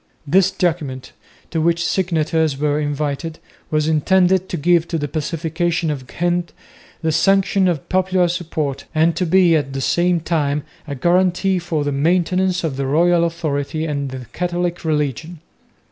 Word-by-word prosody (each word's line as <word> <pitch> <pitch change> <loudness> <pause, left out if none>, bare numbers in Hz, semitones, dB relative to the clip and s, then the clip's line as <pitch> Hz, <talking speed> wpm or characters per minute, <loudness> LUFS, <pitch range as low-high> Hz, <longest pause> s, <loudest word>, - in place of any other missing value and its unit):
This 185 +6 +4
document, 155 -9 -2 0.4
to 165 - 0
which 170 +1 +1
signatures 160 -5 0
were 150 +1 0
invited, 150 +2 -3 0.3
was 155 0 +1
intended 185 +4 +2
to 175 - -3
give 170 +2 +2
to 165 - -2
the 145 -1 -2
Pacification 165 +2 -1
of 130 -3 -6
Ghent 175 0 -1 0.5
the 160 - +1
sanction 195 +2 +3
of 165 -6 -1
popular 185 -1 +2
support 155 -5 -3
and 160 +2 +3
to 180 - -1
be 175 -1 +4
at 140 -3 -1
the 135 - -3
same 175 +5 +1
time 150 -3 -1 0.2
a 140 - -4
guarantee 180 +5 +2
for 165 -3 -2
the 145 - -1
maintenance 180 +5 +1
of 150 -5 -2
the 135 -1 -2
royal 170 +4 +3
authority 160 -2 -2
and 140 -3 -2
the 130 -1 -7
Catholic 175 0 -2
religion. 155 +1 -2
165 Hz, 155 wpm, -19 LUFS, 150-175 Hz, 0.5 s, This